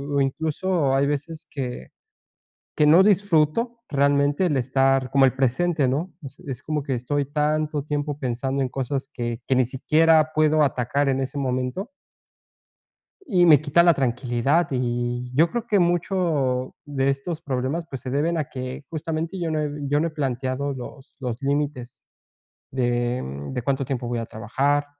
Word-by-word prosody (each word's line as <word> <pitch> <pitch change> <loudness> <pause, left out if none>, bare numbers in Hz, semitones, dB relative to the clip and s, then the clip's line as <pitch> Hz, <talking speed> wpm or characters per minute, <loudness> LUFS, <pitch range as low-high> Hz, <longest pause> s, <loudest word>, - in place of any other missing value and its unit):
o 140 - +3
incluso 155 +1 0
hay 140 - +3
veces 150 +2 -4
que, 125 -4 -5 0.9
que 150 - +4
no 165 +5 +7
disfruto 200 +3 +2
realmente 140 +4 +2
el 150 -5 +1
estar 135 0 +2
como 135 -1 +5
el 130 - +5
presente, 135 +3 +1
¿no?, 155 +8 -2
es 140 0 -10
es 130 -1 -5
como 150 -2 -2
que 135 -2 -2
estoy 140 +4 -1
tanto 150 0 0
tiempo 145 -1 -3
pensando 130 +1 -2
en 130 - -1
cosas 135 +1 -3
que 120 -1 -4
que 130 - +2
ni 130 - +4
siquiera 155 +5 +3
puedo 155 0 +4
atacar 140 +2 0
en 135 0 +1
ese 135 +2 -3
momento. 130 - -2 1.4
Y 185 - +3
me 150 -4 +7
quita 155 +3 +3
la 170 - +6
tranquilidad, 130 +4 +1
y 120 -1 -2
yo 165 +4 +4
creo 240 -1 -3
que 210 -3 +2
mucho 170 -8 0
de 140 -1 0
estos 155 +4 -4
problemas, 140 +5 -2
pues, 135 -4 -6
se 130 - -6
deben 160 +5 0
a 155 - 0
que 130 +2 -7
justamente 165 +3 -3
yo 170 -2 -2
no 155 -1 0
he 150 -1 -1 0.2
yo 145 +1 +2
no 165 - +1
he - - -8
planteado 135 -1 -2
los 135 +2 -10
los 125 -1 -4
límites 140 -3 -2 0.7
de, 120 -1 0
mm, 70 - -6
de 125 - -2
cuánto 135 +1 -1
tiempo 125 -3 -3
voy 120 -1 -2
a 115 - -4
trabajar, 140 +7 0
140 Hz, 170 wpm, -24 LUFS, 130-155 Hz, 1.4 s, no